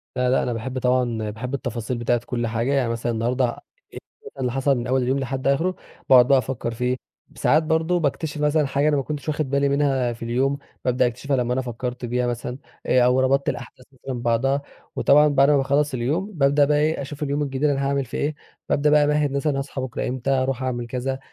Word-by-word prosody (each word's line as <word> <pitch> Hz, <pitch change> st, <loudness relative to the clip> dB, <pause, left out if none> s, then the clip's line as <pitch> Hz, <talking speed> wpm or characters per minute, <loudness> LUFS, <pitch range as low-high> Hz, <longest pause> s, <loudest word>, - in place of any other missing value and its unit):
لأ، 125 Hz, 0 st, +1 dB
لأ، 130 Hz, -, +2 dB
أنا 120 Hz, -, -1 dB
باحب 125 Hz, +3 st, -4 dB
طبعًا 120 Hz, -4 st, 0 dB
باحب 120 Hz, +5 st, -6 dB
التفاصيل 120 Hz, -2 st, -3 dB
بتاعة 120 Hz, 0 st, 0 dB
كُلّ 120 Hz, -2 st, -2 dB
حاجة، 115 Hz, +5 st, -1 dB
يعني 130 Hz, -4 st, +1 dB
مثلًا 115 Hz, +1 st, -2 dB
النهارده 120 Hz, +3 st, 0 dB, 0.5 s
إيه -, -, -7 dB, 0.3 s
بقي -, -, -9 dB
اللي 125 Hz, -, 0 dB
حصل 135 Hz, +1 st, +1 dB
من 120 Hz, 0 st, -4 dB
أول 130 Hz, +1 st, +2 dB
اليوم 130 Hz, +3 st, 0 dB
لحد 135 Hz, 0 st, -3 dB
آخرُه، 165 Hz, +7 st, +1 dB, 0.3 s
باقعُد 125 Hz, -2 st, +7 dB
بقى 135 Hz, 0 st, +5 dB
أفكّر 120 Hz, -2 st, -2 dB
فيه، 125 Hz, +2 st, -1 dB, 0.4 s
ساعات 155 Hz, +2 st, +3 dB
برضه 160 Hz, +2 st, +1 dB
باكتشف 150 Hz, 0 st, -2 dB
مثلًا 150 Hz, 0 st, +2 dB
حاجة 140 Hz, +2 st, +1 dB
أنا 150 Hz, -, +3 dB
ما 135 Hz, -, 0 dB
كنتش 150 Hz, +1 st, -6 dB
واخد 150 Hz, -2 st, -1 dB
بالي 140 Hz, 0 st, +2 dB
منها 135 Hz, -4 st, +1 dB
في 115 Hz, -, -10 dB
اليوم، 130 Hz, +4 st, 0 dB, 0.3 s
بابدأ 125 Hz, 0 st, +2 dB
أكتشفها 130 Hz, +3 st, -2 dB
لمّا 125 Hz, 0 st, 0 dB
أنا 130 Hz, -, 0 dB
فكرت 125 Hz, 0 st, -5 dB
فيها 125 Hz, +1 st, -1 dB
مثلًا، 120 Hz, +1 st, -4 dB, 0.3 s
آآ 125 Hz, -, +4 dB
أو 125 Hz, +1 st, +3 dB
ربطت 135 Hz, +1 st, +2 dB
الأحداث 125 Hz, -, -7 dB
مثلًا 130 Hz, -1 st, -6 dB
ببعضها، 125 Hz, +4 st, +1 dB, 0.3 s
وطبعًا 150 Hz, +2 st, +5 dB
بعد 140 Hz, -1 st, +4 dB
ما 145 Hz, -, +5 dB
باخلّص 140 Hz, +1 st, +1 dB
اليوم 150 Hz, -, -1 dB
ببدأ 145 Hz, -4 st, +3 dB
بقي 145 Hz, +1 st, +2 dB
إيه 155 Hz, +1 st, +1 dB
أشوف 145 Hz, +2 st, -6 dB
اليوم 145 Hz, +1 st, -1 dB
الجديد 135 Hz, 0 st, -4 dB
أنا 140 Hz, -1 st, 0 dB
هاعمل 140 Hz, -1 st, 0 dB
فيه 115 Hz, -, -6 dB
إيه، 150 Hz, +1 st, -1 dB, 0.3 s
بابدأ 150 Hz, +1 st, +2 dB
بقى 150 Hz, 0 st, +5 dB
أمَهِّد 150 Hz, -1 st, +1 dB
مثلًا 140 Hz, +1 st, 0 dB
هاصحى 135 Hz, -1 st, -5 dB
بكرة 130 Hz, -1 st, -3 dB
إمتى، 130 Hz, +1 st, -3 dB
هاروح 130 Hz, -1 st, 0 dB
أعمل 120 Hz, -2 st, -2 dB
كذا، 130 Hz, +2 st, -3 dB
130 Hz, 215 wpm, -23 LUFS, 125-140 Hz, 0.5 s, باقعُد